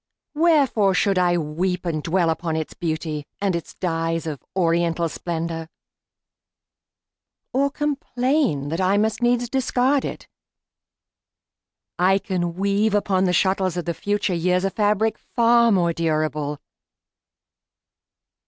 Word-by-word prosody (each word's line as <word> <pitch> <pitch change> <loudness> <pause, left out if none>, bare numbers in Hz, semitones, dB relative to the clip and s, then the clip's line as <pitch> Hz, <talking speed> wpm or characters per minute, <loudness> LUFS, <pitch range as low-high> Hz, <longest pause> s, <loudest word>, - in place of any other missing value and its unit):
Wherefore 285 - +3
should 195 -1 +2
I 175 -1 +3
weep 175 +4 -2
And 160 -3 -1
dwell 170 +1 +1
upon 160 0 -2
its 160 -1 -3
beauty, 155 -3 -4
and 195 -3 0
its 170 - -6
dyes 165 -2 -2
Of 150 -4 -5
oriental 170 -1 +1
splendor, 165 0 -4 1.8
or 275 +2 +2
complain 270 - -1
That 165 +4 -2
I 190 +2 +3
must 220 +3 0
needs 240 0 +2
discard 265 +2 +1
it? - - -6 1.7
I 190 +2 +4
can 180 -4 -2
weave 200 +2 +1
Upon 195 -2 +1
the 180 - +2
shuttles 190 0 +1
of 175 - -3
the 170 - -1
future 205 +1 -1
years 180 +2 +1
A 195 - 0
fabric 210 +1 +1
far 235 0 +3
more 175 -4 +2
durable. 155 -3 -1
185 Hz, 125 wpm, -22 LUFS, 165-215 Hz, 1.8 s, I